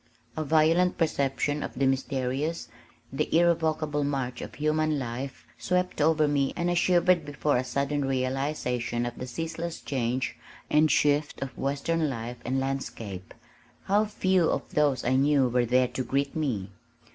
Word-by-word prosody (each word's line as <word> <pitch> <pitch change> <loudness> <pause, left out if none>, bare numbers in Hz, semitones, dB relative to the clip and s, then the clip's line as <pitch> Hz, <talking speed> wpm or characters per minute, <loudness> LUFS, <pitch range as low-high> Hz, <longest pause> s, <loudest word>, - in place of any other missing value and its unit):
A 155 - -2
violent 160 +4 +3
perception 145 -2 0
of - - -5
the 135 - +1
mysterious, 135 +4 -1 0.4
the - - -1
irrevocable 160 -3 +2
march 135 -3 -2
of - - -8
human 155 +1 +1
life 130 +1 -5
swept 180 -3 0
over 155 0 +4
me 140 -2 +1
and 175 0 0
I - - +2
shivered 175 -1 +3
before 145 -1 0
a 125 - 0
sudden 140 +2 -1
realization 130 -2 -1
of 120 0 -4
the 125 - -5
ceaseless 165 +4 -4
change 130 -1 -2 0.4
and 155 +1 +5
shift 145 -1 +2
of 135 - -7
western 145 +3 -1
life 120 -1 -5
and 130 +2 -1
landscape. 115 -8 -5 0.5
How 205 +2 +2
few 185 -4 +2
of - - -2
those 145 -4 +1
I 130 +2 +3
knew 140 -1 +4
were 125 0 +1
there 125 +1 +3
to 130 +1 -3
greet 140 +2 -1
me! 115 -11 -2
140 Hz, 155 wpm, -27 LUFS, 130-155 Hz, 0.5 s, and